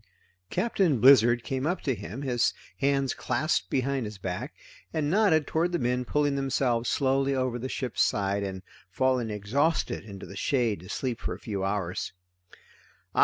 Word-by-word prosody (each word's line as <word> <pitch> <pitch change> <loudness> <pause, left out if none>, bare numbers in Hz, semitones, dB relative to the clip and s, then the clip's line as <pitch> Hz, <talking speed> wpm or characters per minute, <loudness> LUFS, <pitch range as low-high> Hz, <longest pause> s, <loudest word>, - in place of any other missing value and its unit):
Captain 190 - +1
Blizzard 120 -1 +6
came 135 +1 -2
up 175 +1 -1
to 135 - 0
him, 115 +5 -7
his 120 -3 +1 0.2
hands 135 -1 +1
clasped 150 +7 -1
behind 135 -2 0
his 105 -1 -8
back, 95 -1 -5 0.4
and 150 -1 -1
nodded 180 -7 +4
toward 165 +5 0
the 175 - +1
men 125 -1 0
pulling 145 +1 +1
themselves 130 -3 0
slowly 135 0 +2
over 130 -2 -1
the 130 +3 -4
ship's 125 -5 -2
side 100 0 +1
and 95 -1 -4 0.3
falling 130 +3 +1
exhausted 130 +11 0
into 100 -3 -9
the 100 - -10
shade 115 - +1
to 90 +3 -12
sleep 125 +1 -2
for - - -3
a - - -13
few 100 -4 -4
hours. 95 -2 -2
130 Hz, 165 wpm, -28 LUFS, 105-140 Hz, 0.4 s, Blizzard